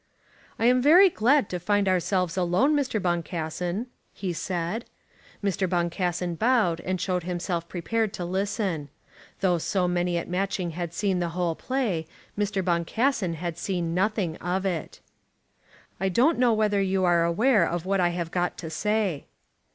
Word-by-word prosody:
"I 225 Hz, -, 0 dB
am 250 Hz, +1 st, +5 dB
very 350 Hz, +8 st, +7 dB
glad 260 Hz, 0 st, +3 dB
to 180 Hz, -, -3 dB
find 205 Hz, +2 st, +1 dB
ourselves 185 Hz, -1 st, +1 dB
alone, 185 Hz, -, +2 dB
Mr. 270 Hz, -6 st, 0 dB
Boncassen," 175 Hz, +3 st, -2 dB, 0.3 s
he 185 Hz, -3 st, -4 dB
said. 175 Hz, +6 st, -3 dB, 0.6 s
Mr. 190 Hz, -2 st, 0 dB
Boncassen 175 Hz, 0 st, -1 dB
bowed 220 Hz, -8 st, +2 dB
and 185 Hz, 0 st, -2 dB
showed 180 Hz, 0 st, -1 dB
himself 175 Hz, -1 st, -3 dB
prepared 215 Hz, +5 st, -1 dB
to 175 Hz, -, -4 dB
listen. 190 Hz, -4 st, -2 dB, 0.5 s
Though 180 Hz, -3 st, +2 dB
so 180 Hz, +2 st, 0 dB
many 175 Hz, 0 st, 0 dB
at 170 Hz, -, -3 dB
Matching 185 Hz, -1 st, -1 dB
had 170 Hz, 0 st, -5 dB
seen 195 Hz, -3 st, 0 dB
the 175 Hz, -1 st, -1 dB
whole 175 Hz, -2 st, +1 dB
play, 205 Hz, -8 st, -2 dB, 0.3 s
Mr. 205 Hz, -2 st, -1 dB
Boncassen 185 Hz, +3 st, 0 dB
had 170 Hz, 0 st, -5 dB
seen 175 Hz, -3 st, -2 dB
nothing 190 Hz, -3 st, 0 dB
of 185 Hz, +2 st, -2 dB
it. 175 Hz, -5 st, -3 dB, 1.0 s
"I 190 Hz, +1 st, +1 dB
don't 250 Hz, -, +3 dB
know 250 Hz, -2 st, +4 dB
whether 210 Hz, -2 st, +2 dB
you 190 Hz, -1 st, +1 dB
are 175 Hz, -2 st, +4 dB
aware 210 Hz, +5 st, +3 dB
of 175 Hz, 0 st, -3 dB
what 195 Hz, 0 st, +1 dB
I 175 Hz, -1 st, +3 dB
have 170 Hz, -1 st, -4 dB
got 180 Hz, -1 st, -1 dB
to 160 Hz, -2 st, -6 dB
say." 210 Hz, -3 st, -1 dB
185 Hz, 160 wpm, -26 LUFS, 175-210 Hz, 1.0 s, very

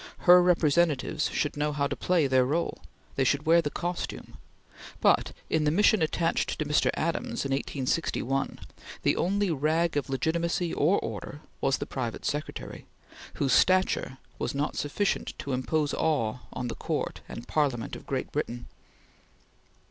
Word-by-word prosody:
Her 180 Hz, 0 st, +8 dB
representatives 165 Hz, -3 st, +2 dB
should 150 Hz, -, -1 dB
know 150 Hz, +1 st, 0 dB
how 145 Hz, -1 st, 0 dB
to 140 Hz, -, -2 dB
play 175 Hz, -4 st, +2 dB
their 130 Hz, -1 st, +4 dB
role; 155 Hz, +6 st, -1 dB, 0.4 s
they 135 Hz, -, +3 dB
should 145 Hz, +4 st, +1 dB
wear 165 Hz, +2 st, +5 dB
the 150 Hz, -, -2 dB
costume; 175 Hz, +3 st, -5 dB, 0.6 s
but, -, -, +3 dB, 0.2 s
in 160 Hz, -1 st, +1 dB
the 150 Hz, -, +3 dB
mission 205 Hz, +4 st, +4 dB
attached 165 Hz, +1 st, 0 dB
to 155 Hz, -, -2 dB
Mr. 150 Hz, 0 st, +2 dB
Adams 235 Hz, -, -2 dB
in 135 Hz, -, -2 dB
1861, 135 Hz, 0 st, -1 dB, 0.5 s
the -, -, +3 dB
only 200 Hz, +1 st, +1 dB
rag 160 Hz, +3 st, +1 dB
of 145 Hz, -, -2 dB
legitimacy 170 Hz, +5 st, 0 dB
or 170 Hz, +7 st, +3 dB
order 115 Hz, +7 st, -6 dB, 0.2 s
was 135 Hz, -, +2 dB
the -, -, -4 dB
private 120 Hz, -4 st, -4 dB
secretary, 150 Hz, +1 st, -4 dB, 0.5 s
whose 135 Hz, -2 st, +1 dB
stature 185 Hz, -7 st, +3 dB, 0.2 s
was -, -, -2 dB
not 145 Hz, +2 st, -1 dB
sufficient 195 Hz, +8 st, -1 dB
to 140 Hz, -3 st, -4 dB
impose 145 Hz, +4 st, 0 dB
awe 125 Hz, -8 st, 0 dB
on 125 Hz, -, -4 dB
the -, -, -3 dB
Court -, -, -3 dB
and 115 Hz, -, -8 dB
Parliament 135 Hz, -7 st, 0 dB
of -, -, -11 dB
Great -, -, -3 dB
Britain. 120 Hz, +1 st, -3 dB
150 Hz, 155 wpm, -28 LUFS, 135-170 Hz, 0.6 s, Her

